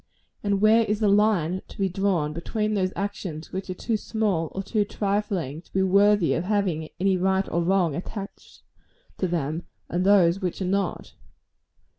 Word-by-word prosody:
and 200 -1 0
where 220 +2 +6
is 210 0 -1
the 215 - +2
line 200 -4 +2
to - - -14
be 195 - +1
drawn 185 -5 0
between 210 +6 -2
those 185 -2 0
actions 195 -6 -5
which 190 +1 -4
are 185 - -3
too 225 +4 -2
small 205 -7 -1
or 195 - -2
too 210 +2 +1
trifling 200 -8 -2
to - - -28
be 190 - +2
worthy 200 -1 +4
of 165 - -1
having 185 -6 0
any 190 +1 +2
right 190 +1 +1
or 170 - 0
wrong 175 -3 +2
attached 195 +3 -8 0.6
to 185 - +1
them, 160 -1 -2 0.3
and 175 +2 0
those 190 -2 +4
which 180 -2 -2
are 190 - -2
not? 195 +2 -2
190 Hz, 175 wpm, -25 LUFS, 175-205 Hz, 0.6 s, where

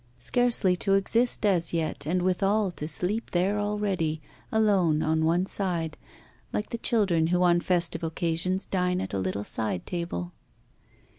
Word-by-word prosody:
Scarcely 225 - +2
to 195 +2 +2
exist 230 +4 +1
as 175 -5 +2
yet, 160 -3 -2
and 180 +2 0
withal 195 +2 +1
to 150 -3 -6
sleep 200 +7 -1
there 190 +4 +1
already, 200 -7 -1 0.3
alone, 195 -8 +2
on 160 0 +1
one 175 +3 +2
side, 175 -6 -1 0.6
like 210 - -3
the 235 - -3
children 190 -10 +2
who 180 +1 +2
on 175 -1 +4
festive 175 -2 0
occasions 170 +3 -1
dine 180 -1 0
at - - -5
a 100 - -1
little 95 +2 -2
side 105 -4 -3
table! 170 - -4
180 Hz, 150 wpm, -27 LUFS, 160-200 Hz, 0.6 s, on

